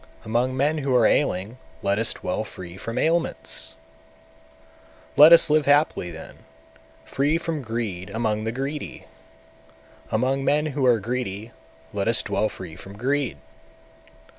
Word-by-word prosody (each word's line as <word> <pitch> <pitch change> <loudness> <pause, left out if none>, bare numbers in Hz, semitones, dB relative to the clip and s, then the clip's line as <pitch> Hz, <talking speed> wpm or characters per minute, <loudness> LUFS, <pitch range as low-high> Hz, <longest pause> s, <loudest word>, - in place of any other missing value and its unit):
among 120 +4 0
men 150 +3 +1
who 135 -3 0
are 120 -3 +5
ailing 110 -2 +1 0.2
let 100 +1 +1
us 115 - 0
dwell - - -3
free 90 -1 -10
from 115 +4 -6
ailments! 160 - -1 1.4
199. - - +7
Let 155 - +10
us 170 - +8
live 155 -1 +3
happily 145 - +3
then, 80 -1 -10 0.7
free 140 - +1
from 165 -3 -3
greed 110 -6 -4
among 110 0 -1
the 110 - -2
greedy! 135 +4 -5 1.0
among 130 +5 0
men 150 +3 +2
who 140 -3 0
are 120 -2 +4
greedy 110 -1 -4 0.4
let - - -1
us - - +2
dwell 110 +1 0
free 85 -4 -9
from 95 +3 -11
greed! 135 - -1
120 Hz, 140 wpm, -24 LUFS, 100-145 Hz, 1.4 s, Let